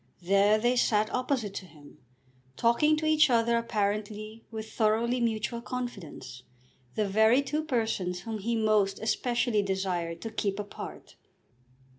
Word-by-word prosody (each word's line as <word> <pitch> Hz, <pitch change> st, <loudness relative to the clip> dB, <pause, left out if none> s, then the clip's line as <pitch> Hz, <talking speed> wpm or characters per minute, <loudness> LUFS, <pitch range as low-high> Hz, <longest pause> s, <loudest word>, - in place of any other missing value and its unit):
There 200 Hz, +3 st, +4 dB
they 240 Hz, +3 st, +2 dB
sat 215 Hz, -2 st, +2 dB
opposite 250 Hz, -5 st, -1 dB
to 190 Hz, -, -6 dB
him, 150 Hz, -2 st, -17 dB, 0.6 s
talking 300 Hz, +7 st, +3 dB
to 310 Hz, -, -2 dB
each 310 Hz, -2 st, +5 dB
other 235 Hz, -1 st, +3 dB
apparently 215 Hz, -1 st, -2 dB
with 220 Hz, -1 st, -7 dB
thoroughly 230 Hz, +3 st, +1 dB
mutual 230 Hz, 0 st, -1 dB
confidence, 235 Hz, -, -6 dB, 0.5 s
the 215 Hz, -2 st, +1 dB
very 220 Hz, +7 st, +4 dB
two 300 Hz, +3 st, -2 dB
persons 220 Hz, -, -1 dB
whom 220 Hz, +2 st, -5 dB
he 230 Hz, +4 st, -1 dB
most 215 Hz, -3 st, +2 dB
especially 235 Hz, 0 st, +1 dB
desired 185 Hz, -4 st, -2 dB
to 225 Hz, -, -5 dB
keep 200 Hz, -2 st, -2 dB
apart. 205 Hz, 0 st, -8 dB
220 Hz, 135 wpm, -29 LUFS, 200-235 Hz, 0.6 s, each